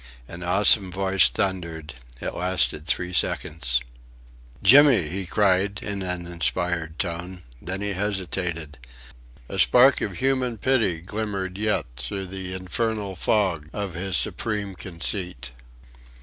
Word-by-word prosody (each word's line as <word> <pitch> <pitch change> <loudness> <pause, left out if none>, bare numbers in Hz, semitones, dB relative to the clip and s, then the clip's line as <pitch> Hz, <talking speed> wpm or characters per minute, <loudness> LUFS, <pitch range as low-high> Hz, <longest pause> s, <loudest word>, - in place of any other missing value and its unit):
An 85 - -9
awesome 95 +2 +4
voice 95 0 +3
thundered!... 85 -5 -3 0.3
It - - -4
lasted 90 -3 0
three 90 +1 -1
seconds. 65 -8 +1 0.8
"Jimmy!" 130 - +7
he 95 +1 -4
cried 100 +1 +2
in 100 -1 -3
an 90 -2 -3
inspired 85 +1 -1
tone. 90 0 -4 0.2
Then 95 +4 -4
he 105 -1 -1
hesitated. 90 -6 -3 0.7
A - - -5
spark 130 +2 +6
of 100 - -2
human 130 -3 0
pity 110 -8 +1
glimmered 95 -1 -4
yet 105 +1 0
through 95 +10 -3
the 95 0 -5
infernal 100 +2 -2
fog 90 -6 +1
of 100 -3 -4
his 95 +2 -1
supreme 105 -3 0
conceit. 85 - -4
95 Hz, 120 wpm, -24 LUFS, 85-100 Hz, 0.8 s, Jimmy